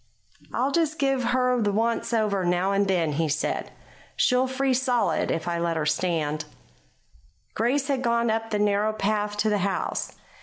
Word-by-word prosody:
"I'll 265 +3 0
just 315 0 +1
give 270 -3 +1
her 250 -1 +2
the 205 -1 +1
'once 230 +3 0
over' 210 -4 +1
now 180 +2 +1
and 200 0 +2
then," 175 -5 +1
he 160 +2 0
said. 155 +2 -2 0.5
"She'll 250 +1 +3
freeze 260 0 0
solid 250 -3 +1
if 165 - -2
I 170 -1 -1
let 170 -1 -1
her 155 - -1
stand." 155 -1 -1 1.1
Grace 265 +5 0
had 275 -3 0
gone 235 -2 +1
up 225 0 -2
the 210 - 0
narrow 205 +1 +1
path 210 0 -1
to 215 +1 +1
the 205 - +1
house. 195 0 -2
215 Hz, 175 wpm, -25 LUFS, 180-250 Hz, 1.1 s, She'll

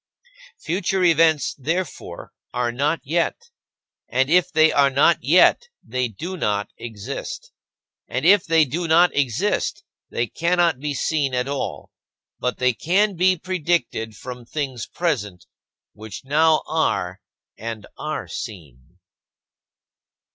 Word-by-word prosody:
Future 185 +2 -1
events, 165 -3 +4
therefore, 155 - -4 0.2
are 120 -1 0
not 145 +6 0
yet. 170 - -1 0.6
And 130 +3 +1
if 180 0 +4
they 160 0 +5
are 140 -1 +4
not 140 +4 +4
yet, 180 - +5 0.2
they 125 +2 -1
do 165 - -6
not 105 - -1
exist. 110 -4 -7 0.6
And 130 +5 -3
if 195 0 +6
they 165 -1 +4
do 165 +6 -3
not 170 +3 +4
exist, 135 -6 0 0.3
they 120 - -1
cannot 170 +2 +1
be 145 0 -3
seen 140 -3 0
at 125 +1 0
all, 140 -1 -4 0.5
but 125 - -1
they 125 -1 +2
can 195 - +1
be 185 +1 +3
predicted 170 -11 -1
from 125 +2 -8
things 130 -2 -4
present, 105 - -2 0.5
which 110 +1 -9
now 155 +3 +3
are 95 - -1 0.3
and 110 -1 -6
are 155 0 -4
seen. 80 - -9
145 Hz, 125 wpm, -22 LUFS, 120-170 Hz, 0.6 s, if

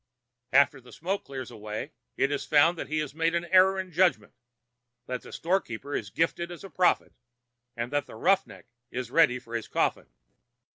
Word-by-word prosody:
After 140 0 +4
the 125 - -16
smoke 190 +5 -3
clears 130 -2 -7
away 110 +5 -6 0.3
it 135 - +2
is 145 - -1
found 155 +4 +4
that - - -5
he 155 - -2
has 150 -3 -2
made 165 +2 +1
an 170 0 0
error 190 +2 +5
of 185 -1 -5
judgment, 170 - +2 0.7
that 125 0 -4
the - - -12
storekeeper 145 - -2
is 100 - -2
gifted 170 +6 -1
as 175 +1 -9
a 195 - -10
prophet, 180 -1 +2 0.6
and 120 +3 -3
that 145 0 0
the - - -11
'roughneck' 190 - +1 0.2
is 125 -1 -5
ready 155 -6 +5
for 120 -2 -12
his 115 -2 -3
coffin. - - 0
150 Hz, 185 wpm, -28 LUFS, 125-175 Hz, 0.7 s, error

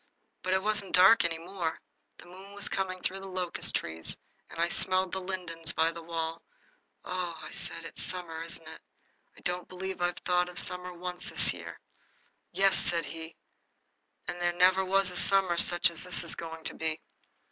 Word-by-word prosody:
But 185 - -1
it 190 - 0
wasn't 210 -2 +2
dark 190 +5 +7
any 165 -1 -1
more. 170 -1 -4 0.4
The - - -14
moon 190 +3 -13
was 205 - -3
coming 185 -1 -3
through 190 +1 -1
the 195 - -9
locust 185 -2 -1
trees, 80 0 +1 0.3
and - - -10
I 170 - +3
smelled 185 +1 +1
the 190 - -3
lindens 175 -4 -1
by 160 +1 +2
the 170 0 -9
wall. 165 0 -4 0.6
"Oh," 180 -2 -3
I 155 - -9
said, 165 - -4
"it's - - -7
summer, 170 -3 -4
isn't 165 -1 -7
it? 160 - -10 0.6
I - - -15
don't 180 0 -1
believe 185 0 -6
I've 175 0 0
thought 180 0 +2
of 180 - -12
summer 180 0 -4
once 180 0 -5
this - - +8
year." - - -9 0.7
"Yes," 195 0 +3
said 170 -2 +4
he, 160 0 -8 0.9
"and 175 0 -5
there 175 0 +1
never 185 +2 +4
was 190 0 +2
a - - -9
summer 195 -3 +3
such 175 0 +4
as 165 - -4
this 180 -1 +4
is 170 - +1
going 165 -1 -7
to - - -3
be." 160 0 -2
180 Hz, 190 wpm, -30 LUFS, 165-185 Hz, 0.9 s, this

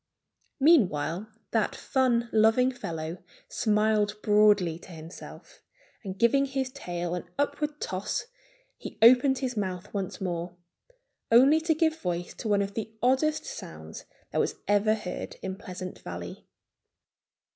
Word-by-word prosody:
Meanwhile 205 - +3 0.2
that 225 -2 +1
fun 245 -3 +1
loving 225 +4 +4
fellow 165 -7 -5 0.3
smiled 210 -1 +1
broadly 205 -6 +4
to 185 - -14
himself. 165 +1 -11 0.4
And 190 -2 -6
giving 255 +5 +4
his 265 -1 -2
tail 175 -5 -4
an 175 0 -5
upward 295 +1 -1
toss 185 +1 -3 0.5
he - - -8
opened 255 +3 +7
his 255 -2 -3
mouth 190 -2 -4
once 195 -3 -3
more, 175 -2 -3 0.8
only 270 +7 +6
to 320 0 +1
give 320 0 +1
voice 175 -1 -3
to - - -4
one 200 -1 +3
of 200 0 -5
the 220 0 -4
oddest 305 +5 +2
sounds - - -9 0.3
that - - 0
was - - 0
ever 205 +1 +3
heard 185 -4 -6
in 190 0 -3
Pleasant 185 -2 -8
Valley. 85 0 -8
210 Hz, 135 wpm, -28 LUFS, 180-255 Hz, 0.8 s, opened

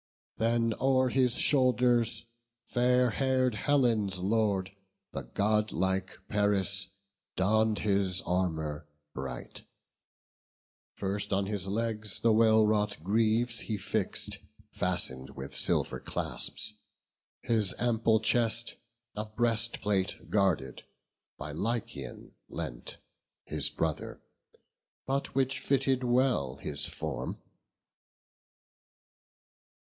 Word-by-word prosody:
Then 115 0 +2
o'er 130 -1 +3
his 125 -1 +2
shoulders 125 -4 +2 0.4
fair 125 0 +3
hair'd 130 0 +1
Helen's 110 -5 +2
Lord, 100 -1 +1 0.4
The 70 - -4
godlike 95 - 0
Paris, 100 -1 +1 0.5
donn'd 110 +3 +2
his 100 -3 +1
armour 80 -5 -1 0.3
bright: 65 -2 -6 1.3
First 100 +1 -2
on 100 0 +2
his 100 -2 -3
legs 105 0 -2
the 115 -1 +4
well 110 0 +5
wrought 105 -1 +1
greaves 115 +4 +2
he 110 - -3
fix'd, 95 0 -2 0.3
Fasten'd 65 0 -1
with 65 0 -7
silver - - +1
clasps; 105 - -2 0.7
his 110 -5 +2
ample 115 -2 +2
chest 115 +1 +1 0.4
A 105 +1 -3
breastplate 110 -3 0
guarded, 85 -11 +1 0.5
by 75 - -6
Lycaon 110 +9 -4 0.2
lent, - - -5 0.5
His 75 -3 +1
brother, 80 -2 -3 0.9
but 135 -1 -2
which 135 0 +1
fitted 135 -1 +1
well 120 - +2
his - - -4
form. 70 -6 -4
105 Hz, 90 wpm, -30 LUFS, 95-120 Hz, 1.3 s, well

